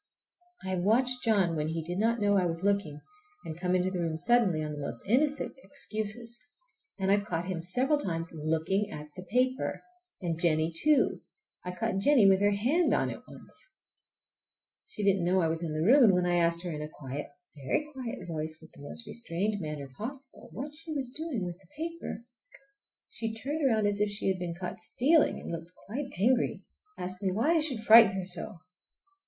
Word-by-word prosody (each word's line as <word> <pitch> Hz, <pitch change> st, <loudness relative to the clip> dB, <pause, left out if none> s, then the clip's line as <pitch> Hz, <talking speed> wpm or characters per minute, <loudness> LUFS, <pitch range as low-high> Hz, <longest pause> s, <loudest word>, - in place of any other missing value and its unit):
I -, -, -3 dB
have 185 Hz, -1 st, 0 dB
watched 250 Hz, +6 st, +3 dB
John 195 Hz, -7 st, +2 dB
when 150 Hz, -1 st, -1 dB
he 160 Hz, 0 st, -3 dB
did 175 Hz, +3 st, -4 dB
not 230 Hz, +2 st, +2 dB
know 205 Hz, -1 st, +3 dB
I 185 Hz, -2 st, +3 dB
was 165 Hz, +1 st, -4 dB
looking, 200 Hz, -7 st, 0 dB, 0.4 s
and 160 Hz, -, -5 dB
come 180 Hz, 0 st, +1 dB
into 185 Hz, +1 st, +1 dB
the 185 Hz, -, -3 dB
room 165 Hz, -2 st, -1 dB
suddenly 190 Hz, -4 st, +3 dB
on 150 Hz, -, -4 dB
the 150 Hz, -, -6 dB
most 140 Hz, -, -4 dB
innocent 285 Hz, +7 st, +1 dB
excuses, 230 Hz, -2 st, -5 dB, 0.5 s
and 190 Hz, -1 st, +1 dB
I've 205 Hz, 0 st, +3 dB
caught 175 Hz, -4 st, -3 dB
him 180 Hz, -3 st, -3 dB
several 255 Hz, -, +1 dB
times 165 Hz, -, -3 dB
looking 160 Hz, +6 st, 0 dB
at 150 Hz, -6 st, -8 dB
the 185 Hz, -, -7 dB
paper! 255 Hz, +7 st, 0 dB, 0.4 s
And 170 Hz, -3 st, -3 dB
Jennie 160 Hz, -1 st, +2 dB
too. 300 Hz, -, +2 dB, 0.4 s
I 180 Hz, -, -5 dB
caught 220 Hz, +1 st, -2 dB
Jennie 240 Hz, -1 st, +5 dB
with 190 Hz, 0 st, +5 dB
her 205 Hz, -, +5 dB
hand 250 Hz, -, +2 dB
on -, -, 0 dB
it -, -, -8 dB
once. -, -, -14 dB, 1.3 s
She 210 Hz, -, -5 dB
didn't 195 Hz, -2 st, +3 dB
know 180 Hz, +2 st, +2 dB
I 165 Hz, -, +2 dB
was 160 Hz, +1 st, 0 dB
in 165 Hz, -2 st, -3 dB
the 155 Hz, +1 st, 0 dB
room, 265 Hz, +6 st, +7 dB
and 200 Hz, -, +6 dB
when 180 Hz, 0 st, +2 dB
I 175 Hz, 0 st, +2 dB
asked 170 Hz, 0 st, +2 dB
her 175 Hz, -, -3 dB
in 150 Hz, -1 st, -5 dB
a 150 Hz, -, -5 dB
quiet, 145 Hz, -1 st, -6 dB, 0.3 s
a 140 Hz, -, -13 dB
very 295 Hz, -, 0 dB
quiet 250 Hz, -7 st, -6 dB
voice, 155 Hz, -1 st, -4 dB
with 160 Hz, -1 st, -16 dB
the -, -, -15 dB
most 145 Hz, +11 st, -5 dB
restrained 205 Hz, -1 st, -2 dB
manner 150 Hz, -3 st, -5 dB
possible, 265 Hz, -, -7 dB
what 290 Hz, +3 st, -6 dB
she 320 Hz, +1 st, -10 dB
was 265 Hz, -4 st, -3 dB
doing 290 Hz, -, -3 dB
with 175 Hz, 0 st, -6 dB
the 190 Hz, -, -23 dB
paper 330 Hz, -6 st, -5 dB, 0.8 s
she 225 Hz, -1 st, -4 dB
turned 290 Hz, +7 st, -3 dB
around 220 Hz, -6 st, +3 dB
as 205 Hz, 0 st, +1 dB
if 210 Hz, -, +2 dB
she 205 Hz, -1 st, -1 dB
had 190 Hz, -1 st, -1 dB
been 175 Hz, -1 st, -4 dB
caught 180 Hz, 0 st, -6 dB
stealing, 285 Hz, +8 st, +3 dB
and -, -, -7 dB
looked 165 Hz, +1 st, -7 dB
quite 265 Hz, +7 st, -4 dB
angry—asked 235 Hz, -, -1 dB
me 190 Hz, -2 st, 0 dB
why 230 Hz, -, +1 dB
I 335 Hz, -, +4 dB
should 270 Hz, -8 st, -2 dB
frighten 220 Hz, -2 st, +8 dB
her 190 Hz, -1 st, -3 dB
so! 175 Hz, -1 st, 0 dB
195 Hz, 205 wpm, -29 LUFS, 170-240 Hz, 1.3 s, frighten